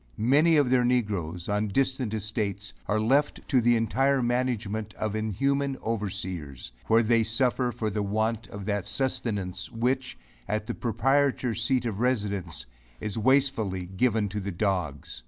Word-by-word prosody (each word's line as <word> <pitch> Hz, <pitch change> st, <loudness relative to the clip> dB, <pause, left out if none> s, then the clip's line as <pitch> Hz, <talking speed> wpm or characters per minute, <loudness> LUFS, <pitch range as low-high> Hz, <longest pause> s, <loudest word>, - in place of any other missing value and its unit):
Many 145 Hz, +9 st, +4 dB
of 140 Hz, -4 st, +3 dB
their 125 Hz, -1 st, +4 dB
negroes, 100 Hz, -9 st, -1 dB
on 105 Hz, +1 st, 0 dB
distant 130 Hz, +1 st, 0 dB
estates, 105 Hz, -1 st, -3 dB
are 105 Hz, +1 st, +1 dB
left 135 Hz, +7 st, +1 dB
to 130 Hz, -3 st, +4 dB
the 120 Hz, +1 st, +4 dB
entire 135 Hz, +4 st, +2 dB
management 115 Hz, -4 st, -1 dB
of 110 Hz, -1 st, -2 dB
inhuman 135 Hz, +6 st, 0 dB
overseers, 95 Hz, -, -4 dB, 0.2 s
where 115 Hz, +1 st, +5 dB
they 115 Hz, 0 st, +3 dB
suffer 120 Hz, +2 st, +1 dB
for 110 Hz, -2 st, -3 dB
the 105 Hz, -, -1 dB
want 110 Hz, +2 st, -1 dB
of 100 Hz, -1 st, -8 dB
that 100 Hz, -1 st, -1 dB
sustenance, 105 Hz, -6 st, -2 dB
which, 125 Hz, -, -1 dB, 0.3 s
at 105 Hz, 0 st, -1 dB
the -, -, -3 dB
proprietors 125 Hz, 0 st, +1 dB
seat 125 Hz, 0 st, +1 dB
of 110 Hz, -4 st, -3 dB
residence, 100 Hz, -, -1 dB, 0.3 s
is 105 Hz, -2 st, -4 dB
wastefully 115 Hz, -7 st, +2 dB
given 105 Hz, +3 st, +1 dB
to 105 Hz, +2 st, -3 dB
the 100 Hz, 0 st, -4 dB
dogs. 85 Hz, -, -2 dB
110 Hz, 150 wpm, -27 LUFS, 100-125 Hz, 0.3 s, where